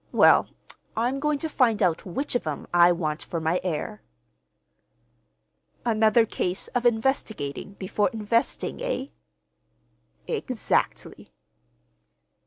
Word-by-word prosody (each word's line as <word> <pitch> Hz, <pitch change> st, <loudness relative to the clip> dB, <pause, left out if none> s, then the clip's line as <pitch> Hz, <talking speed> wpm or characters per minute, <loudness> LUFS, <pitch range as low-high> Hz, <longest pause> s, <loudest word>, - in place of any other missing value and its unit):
Well, -, -, +5 dB, 0.5 s
I'm 245 Hz, +4 st, 0 dB
going 300 Hz, 0 st, +1 dB
to 320 Hz, -, -3 dB
find 245 Hz, -8 st, +2 dB
out 175 Hz, 0 st, +1 dB
which 270 Hz, +11 st, -3 dB
of 245 Hz, -10 st, -1 dB
'em 150 Hz, -2 st, -4 dB
I 175 Hz, 0 st, +7 dB
want 160 Hz, -3 st, -2 dB
for 170 Hz, -, -4 dB
my 160 Hz, +3 st, 0 dB
heir." 185 Hz, +4 st, -3 dB, 1.8 s
"Another 225 Hz, 0 st, +4 dB
case 185 Hz, -3 st, -2 dB
of 245 Hz, 0 st, +1 dB
investigating 220 Hz, -, -1 dB
before 200 Hz, +1 st, 0 dB
investing, 225 Hz, +1 st, -1 dB
eh?" -, -, -2 dB, 1.2 s
"Exactly." -, -, -2 dB
215 Hz, 105 wpm, -26 LUFS, 175-240 Hz, 1.8 s, I